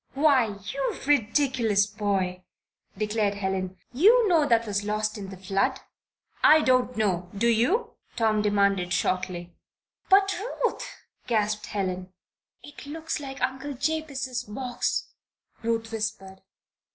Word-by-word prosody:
"Why, 265 -8 +3 0.2
you 275 -1 -2
ridiculous 240 -5 +2
boy!" 190 -3 -2 0.5
declared 210 -1 0
Helen. 190 -2 -3 0.2
"You 435 - +5
know 325 -6 +3
that 230 -2 +3
was 205 -1 -1
lost 215 +1 -1
in 200 -3 -7
the 190 - -9
flood." 195 +8 0 0.6
"I 310 0 +7
don't 255 -3 +2
know. 185 -5 0
Do 235 +4 +2
you?" 340 - +2 0.2
Tom 220 -2 +2
demanded, 200 -3 +2
shortly. 180 -1 -1 0.6
"But, 390 0 +5 0.3
Ruth!" - - -1 0.4
gasped 210 -2 0
Helen. 185 -2 -3 0.5
"It 290 -1 -12
looks 320 +2 -4
like 270 -2 -6
Uncle 265 +2 -2
Jabez's 275 -3 -2
box," 245 +4 -2 0.5
Ruth 225 -1 -1
whispered. 210 -3 -4
225 Hz, 120 wpm, -26 LUFS, 200-270 Hz, 0.6 s, I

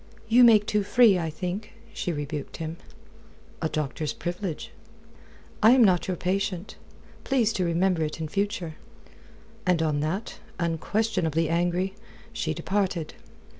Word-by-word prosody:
"You 240 +3 +6
make 220 -3 +7
too 210 0 +1
free, 205 -2 +5
I 165 -1 -2
think," 180 +7 -5 0.2
she 180 - -2
rebuked 145 -2 -5
him. 160 0 -5 0.8
"A 160 - 0
doctor's 150 0 -2
privilege." 175 -1 -4 0.9
"I 220 +3 +8
am 260 -2 +6
not 185 -5 +3
your 185 -2 -2
patient. 185 +1 -2 0.5
Please 240 -5 +2
to 185 - 0
remember 175 +1 +1
it 155 +1 -2
in 160 - -3
future." 185 -3 -2 0.9
And 180 -2 +2
on 150 -2 +1
that, 175 +9 -3 0.2
unquestionably 170 -1 0
angry, 175 +3 0 0.4
she 225 -8 -2
departed. 170 0 -1
180 Hz, 130 wpm, -26 LUFS, 160-205 Hz, 0.9 s, I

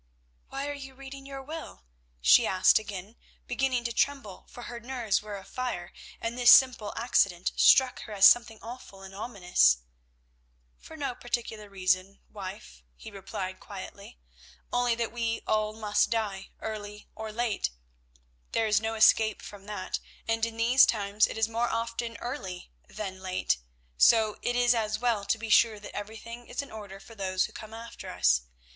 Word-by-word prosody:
"Why 275 +1 -4
are 290 - -3
you 270 -2 -9
reading 275 0 -10
your 275 -1 -7
will?" 315 - -8 0.4
she - - +6
asked 185 +3 +5
again, 205 +1 -8 0.3
beginning 250 0 0
to 235 0 -2
tremble, 270 -8 -1
for 245 - -10
her 240 0 -7
nerves 235 -4 -1
were 210 -1 -7
afire, 195 -3 -5 0.3
and 230 +1 -3
this 245 -1 +5
simple 250 -6 +6
accident 195 -7 +2
struck 260 -1 +5
her 215 - -8
as 195 -1 +5
something 230 -1 +6
awful 225 -5 -10
and 190 0 -10
ominous. 180 - +2 1.0
"For 320 - -12
no 280 -4 -2
particular 230 -3 -4
reason, 185 0 0
wife," 185 - -9
he - - -11
replied 195 -1 -6
quietly, 200 - -10 0.6
"only 245 -1 +2
that 230 -1 -2
we 230 -1 -2
all 215 0 +1
must 210 -1 +1
die, 210 -4 -2
early 210 -1 -6
or 220 0 -6
late. 225 - -1 0.8
There 225 - +2
is 215 0 +3
no 225 0 -2
escape 220 -1 +4
from 200 -1 -11
that, 205 -3 -4 0.3
and 225 0 0
in 225 -1 -9
these 240 +3 +6
times 205 -1 +2
it - - -7
is 220 -1 +2
more 230 +1 -1
often 230 0 -3
early 195 - -6 0.2
than 190 -3 -6
late, 185 - 0 0.4
so 220 -2 +5
it 245 - -1
is 245 0 +4
as 215 -2 -1
well 225 -3 0
to 225 - +1
be 225 0 -6
sure 215 0 +5
that 205 - -10
everything 230 +3 -8
is 265 - -3
in 280 - -13
order 205 -3 -9
for 230 - -14
those 185 -3 0
who - - -10
come 220 0 -9
after 230 +1 -9
us. - - +3
220 Hz, 170 wpm, -28 LUFS, 200-240 Hz, 1.0 s, she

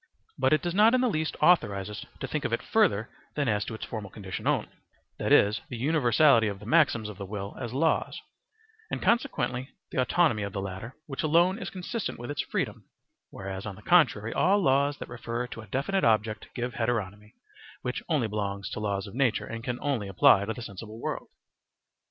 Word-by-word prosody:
But - - +2
it 155 - +3
does 175 -1 -1
not 215 +5 +6
in 255 - +3
the 255 - +3
least 160 -8 -1
authorize 105 - +4
us 105 0 -7
to 135 - -2
think 150 +3 -2
of 120 - -1
it 115 - -1
further 155 - +2 0.3
than 145 -2 0
as 105 -2 +1
to 110 - -5
its - - -6
formal 105 -4 -6
condition 95 -3 -6
only, - - +1 0.5
that - - -1
is, 105 +2 +5
the 120 - -5
universality 135 -3 +4
of 100 -1 -3
the 105 - -11
maxims 120 -5 +3
of 105 -2 -9
the 100 - -4
will 100 0 -5
as 120 -3 -4
laws, 160 +6 +1 0.7
and - - -2
consequently 135 - 0 0.2
the 130 - +1
autonomy 125 -3 +2
of 100 -1 -4
the 100 - -2
latter, 95 +5 -6
which 135 -3 -4
alone 170 +6 +3
is - - -5
consistent 195 +4 -4
with 120 +4 -6
its 145 - -1
freedom; - - -3 0.4
whereas, 95 0 -6
on 100 - -6
the - - -15
contrary, 125 -11 +3
all 195 +3 +3
laws 140 -3 +2
that - - -7
refer 120 0 -4
to 120 -2 -8
a 110 - -13
definite 145 - 0
object 110 -1 +1
give 125 0 -3
heteronomy, 105 -3 -2 0.5
which 125 - -2
only 145 -8 +2
belongs 100 -2 -3
to - - -4
laws 100 -2 -1
of 100 - -10
nature 125 -2 +1
and 115 0 -6
can 125 0 -2
only 130 -8 -1
apply 95 +1 +5
to 110 - -2
the 120 - -7
sensible 110 +2 -8
world. - - -4
120 Hz, 205 wpm, -28 LUFS, 105-150 Hz, 0.7 s, not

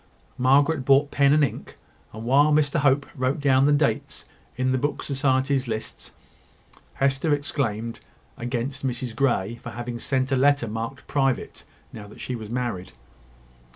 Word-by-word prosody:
Margaret 140 +3 +3
brought 140 +2 +4
pen 140 -1 +3
and 150 +1 +4
ink; 135 - -4 0.3
and 110 +1 -8
while 140 +5 +4
Mr 150 +1 +2
Hope 140 0 +3
wrote 130 +3 -1
down 135 -1 +3
the - - +4
dates 145 -6 0 0.3
in 130 0 +1
the 130 - +1
Book 145 +2 -2
Society's 135 -1 0
list, 110 -1 -6 0.8
Hester 135 +3 +1
exclaimed 115 -6 -3 0.4
against 125 +3 -4
Mrs 125 -2 -3
Grey 120 -4 0
for - - -7
having 120 0 -6
sent 130 +1 -1
her - - +3
a - - +1
letter 140 -2 +3
marked 115 +5 -5
"Private," 135 -3 -1 0.3
now 105 -2 -9
that 105 - -14
she 125 - -4
was 110 -3 -8
married. 120 -7 -3
130 Hz, 155 wpm, -24 LUFS, 120-140 Hz, 0.8 s, brought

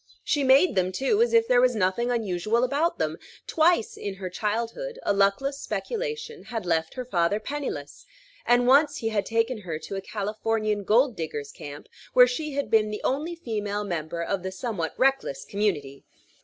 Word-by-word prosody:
She 290 - +1
made 270 +7 +5
them, 185 -1 +1
too, 270 - +1
as 475 - +3
if 460 0 +4
there 245 -8 +5
was 250 -1 +3
nothing 210 +4 +1
unusual 220 0 0
about 290 +7 +1
them. - - -2 0.3
Twice, 320 -7 +2
in 200 -1 -5
her 185 -2 -6
childhood, 230 - -3
a - - +2
luckless 200 +8 +1
speculation 460 -1 -4
had 225 -5 -5
left 160 -2 0
her 255 -1 -4
father 185 -2 +1
penniless; 215 - -5 0.4
and 245 0 +3
once 285 +3 +5
he 225 - -2
had 210 -2 -1
taken 230 +1 0
her 170 -6 -5
to 195 - -7
a 195 - -3
Californian 215 0 -2
gold 245 +4 +3
diggers' 150 -3 -5
camp, 145 0 -9 0.3
where 250 - +9
she 290 +4 -3
had 280 -6 -2
been 215 -1 +4
the 210 - -5
only 305 +6 -1
female 210 -8 -3
member 170 -3 -3
of 195 +2 -2
the 190 +1 -4
somewhat 190 -5 -4
reckless 265 - +1
community. 155 -10 -2
220 Hz, 180 wpm, -26 LUFS, 190-270 Hz, 0.4 s, where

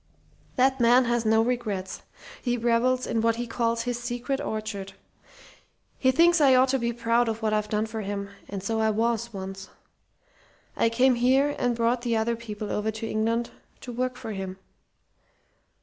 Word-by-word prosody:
"That 265 0 +3
man 245 +2 +5
has 240 -1 0
no 220 +1 +4
regrets. 215 -6 -3 0.4
He 245 -1 0
revels 240 +2 +1
in 225 - -1
what 230 0 +2
he 240 +1 -3
calls 230 0 -1
his 245 0 -2
'secret 245 +3 -3
orchard.' 215 -3 -4 1.1
He 260 - +3
thinks 335 +5 +4
I 270 -3 +6
ought 255 +1 +4
to 270 0 +1
be 235 0 0
proud 235 0 +1
of 225 0 -4
what 215 -1 +1
I've 210 0 0
done 215 0 0
for 220 0 -5
him; 200 0 -4 0.2
and 195 -2 -5
so 225 +2 -1
I 220 0 +2
was 230 +1 0
once. 195 -1 -7 1.1
I 230 - +2
came 255 +3 +3
here 265 +4 +2
and 245 -1 +1
brought 235 +1 +1
the 235 -2 0
other 230 +1 0
people 215 -2 -6
over 210 +1 -1
to 220 +1 -4
England 230 +2 -1 0.3
to 250 - -7
work 250 +1 -2
for 230 -4 -6
him. 190 -2 -5
230 Hz, 180 wpm, -26 LUFS, 220-245 Hz, 1.1 s, I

